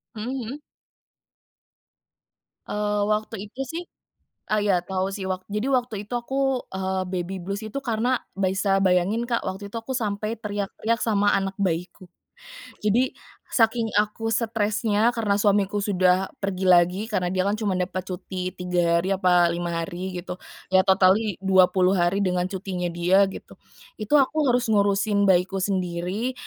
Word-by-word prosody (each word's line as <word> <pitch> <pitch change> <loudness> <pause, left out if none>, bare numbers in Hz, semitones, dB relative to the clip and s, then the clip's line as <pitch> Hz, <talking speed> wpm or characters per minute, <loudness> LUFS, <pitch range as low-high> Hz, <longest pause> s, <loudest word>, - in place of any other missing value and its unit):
Hmm 215 0 -5 0.2
hmm. 285 +3 -6 2.1
Eee, 210 0 -1
waktu 210 -1 -2
itu 255 +6 -7
sih 330 +7 -5 0.7
eee, 215 -1 +2
iya 185 -4 +3
tahu 185 +1 -2
sih. 190 -2 -4
Wak 185 0 -3
jadi, 210 +5 -1
waktu 250 -4 0
itu - - -8
aku, 265 +1 -1
eee, 190 0 -1
baby 185 +1 -3
blues 195 +4 -4
itu. 220 +4 -6
Karena, 240 +1 +1 0.2
bisa 195 0 +1
bayangin 190 +5 +2
Kak, 235 - 0
waktu 200 +2 -5
itu 230 - -6
aku 230 +3 -5
sampai 215 -1 -2
teriak-teriak 210 +2 -2
sama 205 -2 +2
anak 195 0 -3
bayiku. 180 0 -2 0.7
Jadi, 225 +5 +2 0.4
saking 225 -1 +2
aku 220 +2 0
stressnya, 220 0 +1
karena 215 -3 +1
suamiku 205 0 +2
sudah 185 -1 +2
pergi 195 -1 -2
lagi. 180 +3 +4
Karena, 180 -3 0
dia 185 - +2
kan 205 +2 0
cuma 200 -3 0
dapat 185 +1 -2
cuti, 185 0 -5
3 175 -2 +1
hari 195 - 0
apa 180 -2 +3
5 170 -1 -2
hari 180 +1 -6
gitu, 180 +1 -6 0.3
ya, 185 - +6
totally 190 +2 +4
20 185 0 +4
hari 175 +4 +2
dengan 180 -1 0
cutinya 185 -2 -3
dia, 175 +3 +3
gitu. 190 - -11 0.4
Itu, 215 +8 +2
aku 290 +1 +2
harus 245 0 +2
ngurusin 200 0 +2
bayiku 190 +1 +3
sendiri, 185 +5 -2
195 Hz, 150 wpm, -24 LUFS, 185-215 Hz, 2.1 s, ya